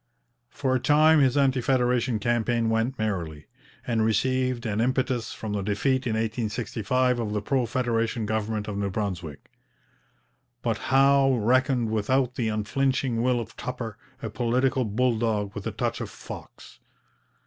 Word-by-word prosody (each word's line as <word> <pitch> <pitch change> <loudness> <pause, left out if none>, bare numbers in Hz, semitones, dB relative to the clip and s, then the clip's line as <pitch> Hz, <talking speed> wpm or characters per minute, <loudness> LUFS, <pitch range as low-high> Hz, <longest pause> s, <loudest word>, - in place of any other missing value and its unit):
For 130 0 -1
a 130 - +2
time 150 +4 +5
his 135 -1 +3
anti 135 -2 +3
federation 125 -2 +1
campaign 115 +1 0
went 115 +4 0
merrily, 85 -9 -3 0.4
and 115 -2 +1
received 125 +3 +1
an 110 -1 0
impetus 130 -1 0
from 110 -2 -5
the 100 - -1
defeat 125 +7 0
in 115 - 0
1865 115 +2 -1
of 105 -3 -2
the 105 - -1
pro 130 -4 0
federation 115 -3 -1
government 110 0 -2
of 100 -1 -3
New 100 -1 -1
Brunswick. 90 -8 -5 1.1
But 115 -2 0
Howe 135 0 +5
reckoned 125 +1 +2
without 125 +4 +1
the 120 -3 -1
unflinching 125 +3 0
will 125 0 +2
of 115 0 -7
Tupper, 115 -5 -6 0.2
a 115 - -4
political 125 +3 +1
bull 115 +2 +1
dog 105 -3 -1
with 100 -1 -5
a - - -2
touch - - -2
of - - -4
fox. - - -11
115 Hz, 150 wpm, -26 LUFS, 110-130 Hz, 1.1 s, time